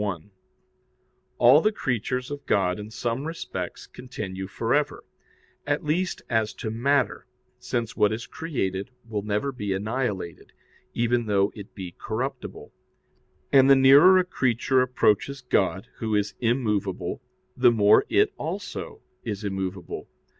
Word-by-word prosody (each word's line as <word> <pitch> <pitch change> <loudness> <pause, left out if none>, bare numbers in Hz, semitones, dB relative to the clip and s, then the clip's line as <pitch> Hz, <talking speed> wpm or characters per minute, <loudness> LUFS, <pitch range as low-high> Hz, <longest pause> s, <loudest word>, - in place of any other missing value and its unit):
1: 100 -2 -4 1.1
All 130 +6 +7
the 215 - +3
creatures 125 - -2
of 145 0 -6
God 95 -1 +1
in 105 +1 -7
some 120 +4 -3
respects 95 - -6
continue 95 -6 -7
for 115 +4 -2
ever, 145 0 0 0.6
at - - 0
least 175 +5 -1
as 110 -2 0
to 110 - -4
matter, 135 +5 0 0.3
since 120 -2 -3
what 105 - +3
is 115 +1 -4
created 100 - -3 0.2
will 105 -2 -2
never 105 +6 -1
be 105 -6 -3
annihilated, 100 -4 -3 0.4
even 120 0 +1
though 100 -1 +2
it 100 -1 -11
be 90 -3 -7
corruptible. 125 +4 -5 0.8
And 135 -1 +7
the 135 - +9
nearer 140 +8 +7
a 185 - +4
creature 130 -5 +1
approaches 125 +1 +1
God, 100 -3 0
Who 110 -2 -1
is 105 -1 0
immovable, 105 -6 -1 0.3
the 125 -1 +5
more 105 -3 +5
it - - +3
also - - -5 0.2
is 105 0 -4
immovable. 95 -2 -4
115 Hz, 135 wpm, -25 LUFS, 100-130 Hz, 1.1 s, the